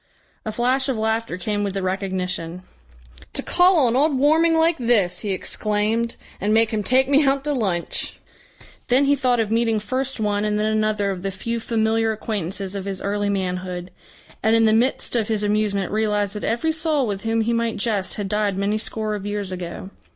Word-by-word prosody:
A 215 - -2
flash 255 +4 +1
of 255 - -1
laughter 220 -3 -1
came 205 +2 -2
with 200 -1 -3
the 195 - -2
recognition. 185 -2 -3 0.7
"To - - +2
call 355 -5 +4
on 235 0 +2
old 285 +1 +3
Warming 320 +4 +4
like 325 -1 +3
this!" 230 -7 +2
he 210 - -4
exclaimed, 215 +4 0 0.3
"and 205 +2 0
make 225 0 +4
him 215 -2 -1
take 255 +5 +3
me 285 +2 +4
out 275 0 +2
to 295 0 0
lunch!" 190 -9 -1 0.7
Then 260 +2 +4
he 285 +1 +4
thought 250 -3 +1
of 220 -1 0
meeting 225 -1 +2
first 260 +4 -3
one 205 -1 0
and 210 0 0
then 215 +1 +1
another 215 -2 0
of 185 -2 -5
the 195 - -2
few 230 +5 -3
familiar 225 0 +1
acquaintances 200 -3 -3
of 195 -1 -5
his 195 -1 -3
early 205 0 -1
manhood, 185 -2 -3 0.5
and 220 +1 +3
in 225 0 +4
the 215 - +4
midst 245 +2 +1
of 225 -3 +1
his 215 -2 -1
amusement 205 -2 0
realised 210 -2 0
that 210 - -6
every 235 +8 0
soul 315 -3 +1
with 200 -3 -3
whom 225 0 0
he 230 +2 0
might 230 -1 -1
jest 200 -3 -1
had 205 -2 -3
died 205 -1 0
many 205 +2 0
score 215 -1 -3
of 205 -1 -4
years 205 -2 -3
ago. 180 +1 -6
215 Hz, 200 wpm, -22 LUFS, 200-235 Hz, 0.7 s, call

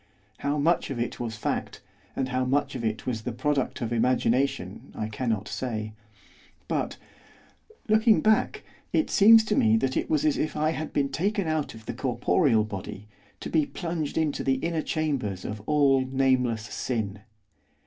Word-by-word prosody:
How 145 +1 -1
much 165 +4 +2
of 135 - -4
it 120 0 -3
was 115 -2 -4
fact, 110 - -3 0.4
and 130 -1 -1
how 130 0 0
much 135 +3 0
of 125 - -5
it 110 -1 -2
was 120 -4 -2
the 125 - -4
product 140 +2 -1
of 120 0 -2
imagination 120 -4 0
I 110 - -3
cannot 110 -2 -2
say; 110 -4 -4 0.7
but, - - -2 0.9
looking 220 +1 +5
back, 215 0 +2 0.3
it 315 - +1
seems 220 +2 +7
to 210 - 0
me 110 0 +4
that 130 +2 0
it - - -1
was 310 -1 +1
as 305 -2 +2
if 155 - -2
I 155 +1 +2
had 155 -1 -4
been 140 -1 0
taken 195 +6 -1
out 155 -6 -1
of 110 -1 -13
the - - -4
corporeal 110 -2 +2
body 105 0 -7 0.3
to - - -5
be 155 -3 +2
plunged 165 -4 -4
into 155 -3 0
the 135 - +2
inner 165 +4 -1
chambers 135 - -2
of 105 0 -5
all 140 -3 +4
nameless 130 -4 +1
sin. 105 -2 -3
130 Hz, 170 wpm, -26 LUFS, 110-155 Hz, 0.9 s, seems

